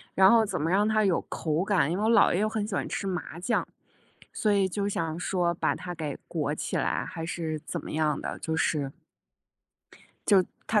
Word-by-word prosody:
然 190 0 +7
后 230 -1 +5
怎 205 - -3
么 160 - 0
让 205 +3 +3
它 215 0 +3
有 190 -4 +3
口 160 +1 -1
感。 185 -7 +2
因 175 - 0
为 205 - -1
我 - - +3
姥 230 - +5
爷 180 - +1
又 215 - +2
很 215 -1 -2
喜 210 - -6
欢 - - -1
吃 - - -3
麻 180 -3 -4
酱， 230 +6 0 0.6
所 215 - 0
以 195 -2 +3
就 200 +2 -1
想 165 -4 -2
说 175 -1 0
把 - - 0
它 180 -1 -6
给 155 -4 -4
裹 - - -1
起 - - -2
来 - - 0
还 165 - -5
是 160 -2 -3
怎 - - -4
么 - - -7
样 155 -1 +1
的， - - -5
就 160 - -2
是， 140 -1 0 1.4
就 195 -3 +5 0.2
他 215 -1 +3
180 Hz, 235 characters per minute, -28 LUFS, 160-205 Hz, 1.4 s, 然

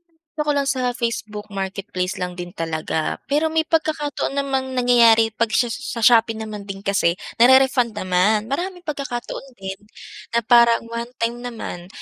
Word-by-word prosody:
pa 320 -1 -46
'ta 300 - -1
ko - - +4
lang 280 -1 0
sa 260 -1 0
Facebook 215 -3 -4
marketplace 190 -1 -3
lang 180 -1 -4
din 175 0 -6
talaga. 160 -1 -3
Pero 300 +3 +2
may 320 0 +2
pagkakataon 305 -4 -1
namang 270 -2 -1
nangyayari 235 -3 +5
'pag 230 +1 0
sha 240 +3 +2
sa 260 0 -5
shopee 225 -1 +5
naman 215 -2 -6
din 195 0 -7
kasi 195 -4 +2 0.2
nare-refund 255 -1 +5
naman, 185 +4 +2
maraming 355 +7 -3
pagkakataon 275 -4 -5
din 190 0 -6 0.6
na - - +5
parang 235 0 +5
one 235 0 -4
time 235 +1 -1
naman, 230 -8 -7
235 Hz, 160 wpm, -21 LUFS, 200-270 Hz, 0.6 s, nangyayari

